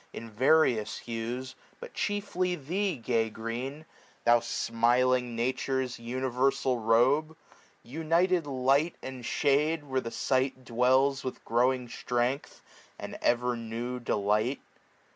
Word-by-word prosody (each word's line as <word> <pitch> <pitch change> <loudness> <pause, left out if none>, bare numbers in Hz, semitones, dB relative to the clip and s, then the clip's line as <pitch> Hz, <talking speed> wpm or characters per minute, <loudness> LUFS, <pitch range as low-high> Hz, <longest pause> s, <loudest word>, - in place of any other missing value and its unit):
In 115 0 -8
various 115 -3 +3
hues; 120 +3 -5 0.3
but 485 -1 -10
chiefly 190 -3 -1
thee, 180 +5 -2
gay 115 -2 0
Green! 120 +7 -5 0.4
Thou 120 0 +6
smiling 120 +1 +1
Nature's 130 +1 -1
universal 130 +1 0
robe! 130 +8 +3 0.5
SPRING. 120 - -15
United 170 +1 +2
light 135 +4 +2
and 130 -2 -7
shade! 150 +5 +1
where 130 -2 -1
the 115 - -5
sight 130 +1 -1
dwells 130 +3 +2
With 130 - -6
growing 125 +2 +1
strength, 120 +3 -2 0.3
and - - -7
ever 120 0 +2
new 120 +2 -4
delight. 110 +3 0
130 Hz, 115 wpm, -29 LUFS, 120-140 Hz, 0.5 s, Thou